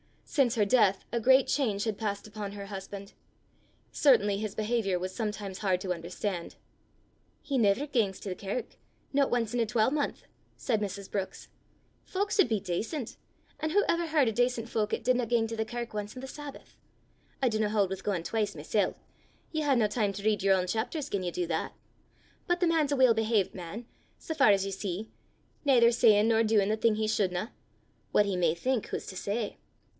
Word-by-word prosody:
Since 265 -6 +2
her 210 -3 +3
death 200 -3 +3
a 235 - 0
great 260 +3 +5
change 215 -8 0
had 220 -3 -2
passed 205 -2 -3
upon 210 -2 -6
her 200 -1 -7
husband. 195 0 -8 0.8
Certainly 210 -8 +4
his 215 -1 -4
behaviour 215 -3 0
was 185 +1 -4
sometimes 210 -3 -4
hard 185 -3 +1
to 185 -2 -1
understand. 175 +1 -4 0.9
"He 280 -3 -2
never 220 +4 +3
gangs 225 -10 0
to 200 - -5
the - - -1
kirk 200 +6 -5 0.4
no 280 0 +3
ance 230 -2 -1
in 245 - 0
a 230 - +3
twalmonth!" 240 +7 0 0.3
said 225 -4 0
Mrs. 200 -1 -5
Brookes. 195 -2 -4 0.6
"Fowk 405 +2 -2
sud 395 -4 +4
be 220 -4 0
dacent, 220 - -3 0.4
an' 310 +1 -2
wha 410 - +6
ever 335 0 +1
h'ard 300 -6 +3
o' - - -1
dacent 245 0 0
fowk 215 -1 -1
'at - - -1
didna 250 -1 +2
gang 230 -1 +2
to 225 0 -5
the 220 - 0
kirk 235 0 -5
ance 210 +1 -5
o' - - -5
the 265 - -7
Sabbath! 290 +1 -10 0.7
I 255 - +4
dinna 215 -1 0
haud 205 -3 +2
wi' 190 - -3
gaein' 190 -3 -2
twise 210 0 -1
mysel': 175 +7 0 0.6
ye 315 - -1
hae 285 -3 +3
na 230 -3 +3
time 210 -2 0
to 200 +1 -7
read 215 -1 +2
yer 195 0 +4
ain 180 - -1
chapters 245 - -2
gien 200 -7 -2
ye 180 - -1
do 175 0 -2
that. - - -2 0.7
But 350 0 +1
the 355 - +4
man's 315 -3 +2
a - - +2
weel 260 -3 +6
behavet 220 -3 +1
man, 185 +6 -7 0.3
sae 320 - -5
far 280 -8 +5
as 195 -1 +4
ye 195 - -3
see, 195 +2 -4 0.5
naither 245 -5 +5
sayin' 225 -2 +5
nor 225 0 +4
doin' 215 -3 +3
the 215 - +1
thing 225 -1 +3
he 215 0 -1
shouldna: 200 -1 0 0.6
what 205 - +5
he 195 -2 -1
may 170 -2 +2
think, 255 +5 -1
wha's - - -3
to 190 - -7
say! 205 +3 -3
215 Hz, 200 wpm, -29 LUFS, 200-245 Hz, 0.9 s, wha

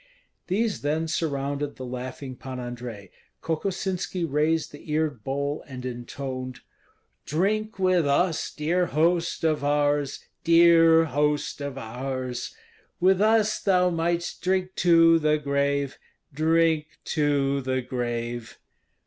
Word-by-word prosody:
These 210 +3 0
then 155 +3 0
surrounded 145 -2 -2
the 130 - -7
laughing 130 +1 -6
Pan 130 0 -7
Andrei. 120 -5 -7 0.3
Kokosinski 180 +1 -2
raised 155 +2 0
the 145 +2 -13
eared 150 -7 -1
bowl 140 +2 -2
and 130 -2 -8
intoned: 130 +1 -6 0.7
"Drink 210 +8 0
with 185 -4 +2
us, 160 +4 +1
dear 175 +4 0
host 165 +4 +1
of 155 -3 +1
ours, 145 -1 0 0.2
Dear 165 -1 +6
host 145 0 0
of 140 -2 -5
ours! 130 +1 -5 0.4
With 190 +2 +4
us 215 0 +3
thou 180 -2 +3
mightst 170 +1 -1
drink 185 0 0
to 165 -1 +6
the 155 -1 +2
grave, 140 -1 -1 0.3
Drink 160 0 +1
to 140 -3 +1
the 130 0 -1
grave!" 120 -2 -4
150 Hz, 115 wpm, -26 LUFS, 135-170 Hz, 0.7 s, Dear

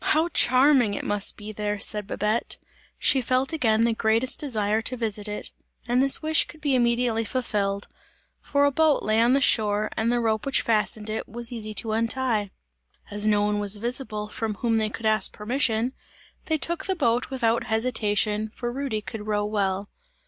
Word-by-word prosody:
"How 320 +2 +2
charming 255 -7 +4
it - - -5
must 205 -1 -1
be 210 0 -8
there!" 210 0 -3
said 210 -1 0
Babette; 215 +3 -1 0.4
she 265 - +3
felt 255 +4 0
again 225 -8 +2
the 230 0 +2
greatest 225 +3 +2
desire 220 -6 0
to 255 +3 -2
visit 215 -3 -2
it, 210 0 -3 0.4
and 245 +2 +2
this 275 +3 +2
wish 315 0 +3
could 315 - -13
be 290 -2 0
immediately 235 -2 +1
fulfilled; 205 -4 -2 0.5
for 285 0 +1
a 285 - +3
boat 310 +1 +2
lay 215 +1 +2
on 240 +2 +4
the 275 - +4
shore 215 -5 +3
and 225 +2 0
the 240 - +1
rope 220 -2 0
which 275 -3 +1
fastened 215 -1 0
it, 220 +1 -4
was 235 +2 -3
easy 215 -3 -5
to 225 0 -2
untie. 225 -1 0 0.6
As 205 +1 +1
no 205 -1 +3
one 210 0 0
was 205 0 +2
visible, 230 -2 -3
from 215 0 -4
whom 225 0 0
they 215 -1 +1
could 225 +1 -7
ask 215 -2 +2
permission, 235 +1 0 0.5
they 315 -3 0
took 340 +2 -1
the 380 - 0
boat 245 -6 0
without 235 -3 0
hesitation, 220 -2 +1
for 240 -1 -4
Rudy 260 -4 -3
could 215 0 -8
row 205 -1 0
well. 200 -2 -1
225 Hz, 185 wpm, -25 LUFS, 210-255 Hz, 0.6 s, charming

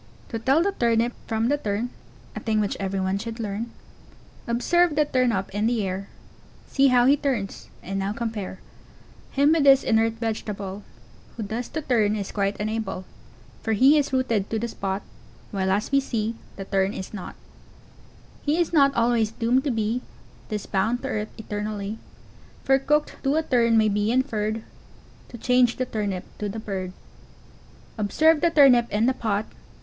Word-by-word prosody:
] 110 - -26
To 225 - -3
tell 270 +8 +3
the 400 - +1
Turnip 235 -6 +1
from 225 +1 0
the 290 +1 +1
Tern, 220 +1 -2 0.4
A - - -3
thing 220 -1 0
which 205 -1 0
everyone 195 0 -1
should 230 +2 -6
learn, 215 +1 -3 0.8
Observe 300 +8 +2
the 300 0 +3
Tern 255 -4 +2
up 190 -2 -2
in 210 +2 +1
the 230 -3 +1
air, 190 +2 -4 0.6
See 275 0 +3
how 250 -2 +5
he 275 +3 +6
turns, 260 -9 -3
and 195 +1 -3
now 195 +1 -1
compare 215 -4 -4 0.7
Him 285 +2 +3
with 320 -2 +3
this 275 -1 +7
inert 225 0 +2
vegetable, 210 -3 -4 0.6
Who 225 - -3
thus 225 +4 -4
to 315 - -4
turn 215 -5 +2
is 200 -2 -4
quite 200 -1 -1
unable, 210 -3 -3 0.6
For 225 - 0
he 265 +8 +6
is 290 -2 +1
rooted 235 -6 0
to 225 - -1
the 235 +2 -2
spot, 195 -3 -3 0.5
While 190 -2 -1
as 200 +6 0
we 275 - +5
see 225 -4 -2 0.2
the 195 - -6
Tern 195 0 0
is 190 - -7
not: 200 -4 -7 1.1
He 300 +2 +1
is 345 0 0
not 275 -3 +5
always 230 -2 +2
doomed 235 +4 +1
to - - +1
be 225 +2 -1 0.5
Thus 210 -2 -3
bound 225 +6 0
to 270 - -3
earth 215 -3 -2
e 220 - -8
tern 210 0 -3
ally, 210 0 -4 0.7
For 270 0 +4
"Cooked 300 +2 0
to 275 +1 +1
a 320 - +2
turn" 235 -5 +3
may 215 -1 +4
be 205 +1 +1
inferred, 220 -4 0 0.7
To 235 - -9
change 250 0 +3
the 255 - -1
Turnip 205 -6 -3 0.2
to 210 - -2
the 210 - -5
Bird. 195 -4 -4 1.1
Observe 305 +10 +3
the 340 - +4
Turnip 265 -7 +6
in 210 +3 +2
the 260 - +3
pot. 220 -4 -1
225 Hz, 180 wpm, -25 LUFS, 205-255 Hz, 1.1 s, this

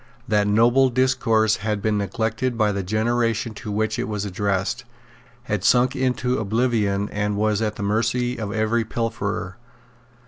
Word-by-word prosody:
That 105 -1 +2
noble 120 +5 +4
discourse 120 -4 +2
had 105 0 -2
been 105 0 0
neglected 110 +5 -2
by 110 -2 +2
the 100 -1 -2
generation 115 +3 0
to 105 0 -7
which 110 +1 -1
it - - -2
was 105 -1 -3
addressed, 100 +4 -1 0.6
had 105 -6 -2
sunk 125 +3 +3
into 125 -1 0
oblivion, 110 -2 0
and 105 0 -2
was 105 0 +1
at 105 -1 -1
the - - -5
mercy 115 +4 0
of 105 -2 -3
every 110 +2 +1
pilferer. 110 -4 -3
110 Hz, 150 wpm, -23 LUFS, 105-120 Hz, 0.6 s, noble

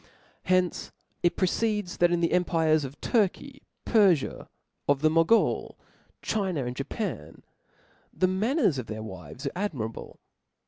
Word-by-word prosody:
From - - -27 0.4
hence 185 -1 +1 0.3
it 175 -1 +2
proceeds, 210 0 0
that 175 0 +4
in 175 -1 +1
the 170 - +1
empires 160 -3 +2
of 135 +1 -8
Turky, 255 +5 0 0.2
Perfia, 195 - +2 0.4
of 145 -1 +2
the 155 0 +4
Mogul, 165 +8 +2 0.5
China, 185 - -1
and 125 0 -4
Japan, 140 - -5 0.7
the 185 - +1
manners 200 - +1
of 125 - -6
their 110 0 -5
w^ves 95 - -9
are 140 - -1
ad 205 0 -2
mirable. 110 -4 -6
175 Hz, 140 wpm, -27 LUFS, 140-200 Hz, 0.7 s, that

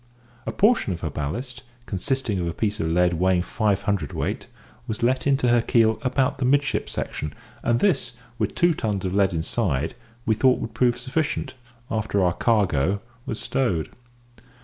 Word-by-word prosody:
A - - 0
portion 215 - +3
of 85 - -7
her 80 - -2
ballast, 115 - -4 0.2
consisting 110 +1 -1
of 85 - -1
a 85 - -3
piece 105 -1 -1
of 80 - 0
lead 90 +2 +3
weighing 90 +1 +2
five 100 -1 0
hundredweight, 100 - -2 0.4
was 110 -1 -3
let 130 +3 +2
into 135 -3 +3
her 120 0 +5
keel 115 -1 +3
about 135 +2 +1
the - - -1
midship 140 +2 +2
section, 75 -1 -4 0.3
and 120 0 +2
this, 195 -10 +2 0.3
with - - -1
two 175 0 +4
tons 105 -9 -2
of 90 - -1
lead 100 -1 +3
inside, 80 - -1 0.3
we 110 - +3
thought 130 +3 +4
would 115 - -5
prove 120 +1 +2
sufficient, 140 +5 -2 0.4
after 110 -3 0
our 90 -1 +3
"cargo" 100 - +2 0.3
was 115 -4 -3
stowed. 85 - -1
110 Hz, 170 wpm, -24 LUFS, 90-125 Hz, 0.4 s, her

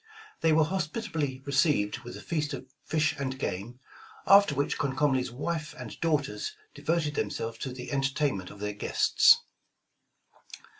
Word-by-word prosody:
They 165 - +4
were 155 0 +5
hospitably 155 - -2
received 135 -6 +2
with 120 0 -9
a - - -11
feast 150 -3 -1
of - - -9 0.2
fish 155 -1 +2
and 130 -1 -2
game, 115 +4 -4 0.5
after 200 -6 +6
which 140 +1 -1
Comcomly 135 -1 +2
's 125 - -4
wife 150 +5 -4
and - - -8
daughters 160 - 0 0.2
devoted 160 -2 0
themselves 115 -5 -3
to 130 - -4
the 125 0 -7
entertainment 135 -8 0
of 105 - -12
their 105 0 -3
guests. 105 - +4
140 Hz, 145 wpm, -29 LUFS, 125-155 Hz, 0.5 s, after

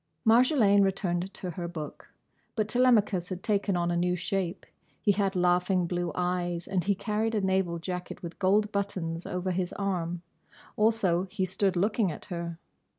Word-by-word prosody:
Marjolaine 225 -3 +5
returned 190 -1 0
to 180 - -5
her 170 +1 -5
book. 160 -3 -8 0.4
But 215 -2 0
Telemachus 215 -7 +3
had 185 -1 -5
taken 200 -3 +1
on 175 0 0
a - - 0
new 180 +1 +1
shape. 180 0 -2 0.3
He 205 - +3
had 195 -1 0
laughing 180 +1 +2
blue 175 0 -2
eyes 175 -1 -1
and 185 -2 0
he 200 +3 +1
carried 220 +3 -1
a 210 - +1
naval 190 -3 +1
jacket 180 +2 -6
with 170 0 -7
gold 205 +2 +3
buttons 185 -5 -3
over 180 +1 -2
his 180 0 -1
arm. 175 -3 -2 0.5
Also 200 -5 +2
he 190 -1 -1
stood 190 0 0
looking 200 +1 +1
at - - -9
her. 170 -1 -4
185 Hz, 165 wpm, -28 LUFS, 175-205 Hz, 0.5 s, Marjolaine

